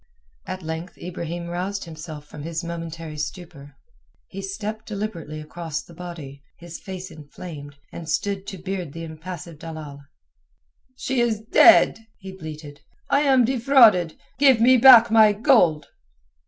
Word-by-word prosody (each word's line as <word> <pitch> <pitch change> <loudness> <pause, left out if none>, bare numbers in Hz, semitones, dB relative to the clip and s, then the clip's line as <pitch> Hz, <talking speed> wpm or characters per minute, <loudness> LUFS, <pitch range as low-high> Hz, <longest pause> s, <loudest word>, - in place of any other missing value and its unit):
At 185 -1 -6
length 160 +3 -6
Ibrahim 170 -1 -6
roused 185 +3 -4
himself 155 -2 -9
from 150 0 -11
his 165 +2 -5
momentary 165 -2 -7
stupor. 150 -3 -8 0.5
He 195 - -7
stepped 210 +3 -6
deliberately 200 -8 -5
across 160 0 -6
the 170 - -16
body, 165 -5 -9 0.2
his 170 0 -10
face 190 0 -8
inflamed, 145 -1 -10 0.2
and 165 -1 -8
stood 195 +5 -2
to 195 - -6
beard 180 -4 -5
the 165 - -7
impassive 165 0 -9
dalal. 155 -3 -9 0.9
"She 255 -1 -1
is 225 -3 0
dead!" 230 +5 +6 0.2
he 190 -1 -10
bleated. 155 -5 -10 0.3
"I 280 - +4
am 265 -4 +4
defrauded. 230 - +4 0.2
Give 270 -4 +5
me 250 +3 +6
back 240 -2 +8
my 220 -2 +6
gold!" 200 - +3
175 Hz, 140 wpm, -23 LUFS, 160-210 Hz, 0.9 s, back